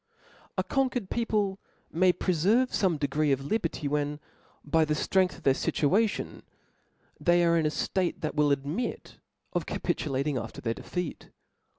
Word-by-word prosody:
A - - +2
conquered 255 -6 -1
people 210 -4 0 0.3
may 180 +3 +4
preftrve 190 +9 +2
fome 185 -6 +2
degred 145 0 +1
of 135 0 -2
liberty, 170 -5 -1
when 145 0 -1 0.5
by 160 +2 +3
the 155 0 0
ftrength 185 +3 +1
of 170 - -16
their 135 - +5
fituation, 195 +11 0 0.8
they 175 0 +4
are 170 0 +4
in 160 -2 +3
a - - +2
ftate, 180 +3 -1
that 155 - -2
will 150 -1 +3
admit 140 - -3 0.3
of - - -1
capitulat 135 -2 -1
ing 145 -3 0
after 115 -1 -7
their 115 -1 -1
defeat. 180 +6 -5
160 Hz, 155 wpm, -28 LUFS, 145-190 Hz, 0.8 s, their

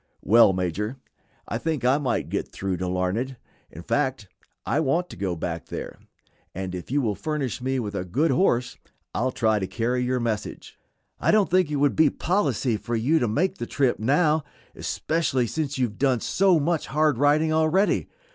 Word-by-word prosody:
"Well, 115 -1 +6
Major, 95 +6 -2 0.5
I 115 - -3
think 155 -5 -2
I 130 +3 +4
might 135 -4 -1
get - - -2
through 95 -2 -3
to 90 - -3
Larned; 95 +9 -1 0.3
in 85 - -11
fact 130 -5 -1 0.4
I 145 - +1
want 165 +4 0
to - - -8
go 95 -3 -2
back 85 0 -4
there, - - -7 0.6
and 95 0 -4
if 90 -1 -7
you 140 +2 +1
will 110 -3 +1
furnish 140 0 -3
me 130 +1 -1
with 105 -4 -4
a 100 - -2
good 135 - +1
horse 125 -10 +1 0.4
I'll 130 +4 0
try 110 -3 +1
to 95 - -3
carry 120 +6 -1
your 125 0 0
message." 115 -3 -4 0.4
"I - - 0
don't 215 -4 +3
think 185 -3 +3
it 150 - -2
would 145 0 +2
be 155 -2 +5
policy 140 - 0
for 120 +2 -4
you 135 +9 +2
to 120 - +1
make 155 - 0
the 120 - -4
trip 135 -3 +1
now, 150 +6 +2 0.3
especially 155 -6 -1
since 145 +3 -3
you 130 - +2
have 105 -3 -8
done 130 -3 +2
so 185 - +3
much 160 +2 0
hard 150 -3 +1
riding 150 +2 +3
already. 160 +6 +2
130 Hz, 190 wpm, -25 LUFS, 110-155 Hz, 0.6 s, Well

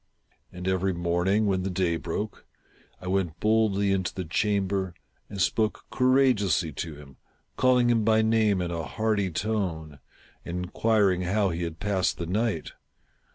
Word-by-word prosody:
And 90 +1 -7
every 95 0 +1
morning, 90 +5 +1
when 95 -2 +1
the^day 90 -3 -1
broke, - - -5 0.5
I - - -12
went 90 -3 -1
boldly 105 -2 +2
into 95 -2 0
the 95 - -4
chamber, 95 0 0 0.3
and 100 - -7
spoke 110 +3 0
courageously 125 - +2
to 80 +2 -5
him, 70 -2 -14 0.4
calling 125 -2 +3
him 115 -2 +2
by 110 0 +3
name 110 -4 +2
in 85 - -3
a 85 -1 -2
hearty 105 +3 -1
tone, 85 -6 -3 0.4
and 90 +1 -4
inquiring 100 -2 +2
how 95 +2 +1
he 85 +1 -4
had 85 -1 -4
passed 95 -4 0
the 85 - -4
night. 100 -1 -1
95 Hz, 150 wpm, -27 LUFS, 85-110 Hz, 0.5 s, calling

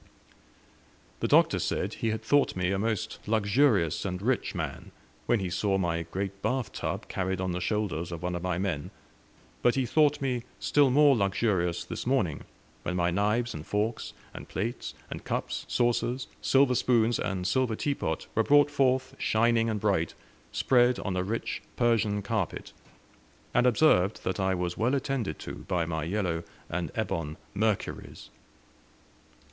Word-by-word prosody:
The - - 0
Doctor - - +4
said - - -1
he 115 - -2
had 110 0 -3
thought 145 0 +3
me 90 0 0
a 95 - 0
most 110 -1 -2
luxurious 105 - +2
and 90 -2 -3
rich 120 +1 -1
man, 80 -6 -4 0.4
when 120 - +3
he 95 -2 -3
saw 95 +1 +1
my 85 -3 0
great 95 +3 -5
bath 125 +2 -1
tub - - -4
carried 95 -1 -2
on 95 -1 -1
the 90 +1 -3
shoulders 90 -4 -1
of 85 0 -6
one 90 0 -1
of 90 - -3
my 90 -1 -1
men; 90 -6 -2 0.7
but 120 - +3
he 135 -1 +1
thought 150 +3 +3
me 130 -4 -1 0.2
still 145 -2 +3
more 145 +1 +6
luxurious 95 -4 0
this - - -5
morning, 115 - 0 0.4
when 90 - -3
my 85 -1 +1
knives 105 +6 +1
and 75 0 -8
forks, 110 +3 -1 0.2
and - - -9
plates, 115 +6 -4 0.2
and - - -6
cups, - - -3
saucers, 120 +1 0 0.2
silver 135 -1 +4
spoons, 120 -2 +2
and 95 -2 -2
silver 125 +2 +1
teapot 110 - -2
were 115 - +3
brought 145 +4 +5
forth 130 -2 +1
shining 115 +1 +2
and 110 -2 -1
bright, 95 -6 0 0.4
spread 125 -1 +3
on 100 -2 -2
a 90 - +1
rich 105 +5 -3
Persian 110 -4 +2
carpet, 100 -4 -3 0.8
and 125 +1 +4
observed 110 -7 +3
that 95 0 -2
I 95 0 +1
was 90 -1 -2
well 120 +5 +2
attended 130 - -2
to - - -6
by 85 -2 0
my 80 -2 -2
yellow 90 -3 -1 0.3
and 85 -3 -2
ebon 85 -8 -2 0.2
Mercuries. 105 0 -2
105 Hz, 160 wpm, -28 LUFS, 90-120 Hz, 0.8 s, more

